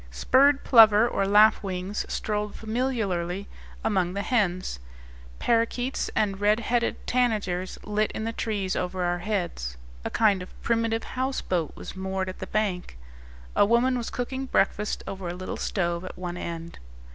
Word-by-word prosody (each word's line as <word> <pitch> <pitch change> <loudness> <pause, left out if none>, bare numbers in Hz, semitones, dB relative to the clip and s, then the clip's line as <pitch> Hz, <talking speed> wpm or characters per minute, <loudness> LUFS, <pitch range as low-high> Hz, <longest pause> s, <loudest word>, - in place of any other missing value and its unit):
Spurred 270 - +4
plover, 220 -2 +7
or 195 -4 0
lapwings, 200 -2 +3
strolled 210 -1 -2
familiarly 210 -6 -2 0.4
among 185 -4 +1
the 200 - -1
hens. 185 - 0 0.6
Parakeets 235 - 0
and 200 -2 0
red 210 +2 +4
headed 235 +1 0
tanagers 210 -7 0
lit 210 +1 0
in 220 - -4
the 225 +1 -2
trees 205 -5 -2
over 180 0 -2
our 175 0 0
heads. 175 - -3 0.3
A - - -2
kind 205 -4 +3
of 180 - -11
primitive 230 -1 +1
houseboat 250 - -2
was - - -8
moored 190 0 -2
at 185 - -8
the - - -5
bank. 190 - -2 0.6
A - - +6
woman 235 +4 +3
was 240 -2 -3
cooking 260 +2 -4
breakfast 210 -2 0
over 190 -2 -5
a 175 - -4
little 185 +1 -5
stove 175 -2 -1
at 185 - -8
one 175 -1 -4
end. 170 -1 -6
205 Hz, 150 wpm, -26 LUFS, 180-230 Hz, 0.6 s, plover